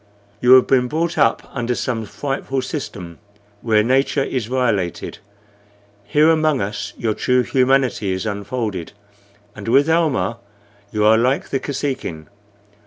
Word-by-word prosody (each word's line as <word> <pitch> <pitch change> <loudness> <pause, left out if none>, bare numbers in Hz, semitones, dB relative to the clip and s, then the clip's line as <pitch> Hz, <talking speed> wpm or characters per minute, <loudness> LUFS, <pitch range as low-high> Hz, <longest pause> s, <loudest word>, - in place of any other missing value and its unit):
You 125 +1 +6
have 130 -1 +7
been 125 -2 +2
brought 165 +5 -1
up 115 - +2
under 125 -1 -2
some 115 -4 -3
frightful 135 +2 -3
system, 100 - -6 0.4
where 110 -2 +3
nature 135 +3 +1
is 125 -5 -3
violated. 115 -9 -1 0.9
Here 155 +2 +4
among 155 -3 +2
us 105 +4 -4
your 110 -2 -1
true 125 +3 +1
humanity 130 -6 +1
is 95 +2 -3
unfolded, 100 -3 -4 0.6
and 100 0 -9
with 140 +6 +4
Almah 145 - +1 0.5
you 105 -1 0
are 110 +1 +5
like 130 +4 0
the 135 - -1
Kosekin. 130 - -4
125 Hz, 135 wpm, -20 LUFS, 105-135 Hz, 0.9 s, have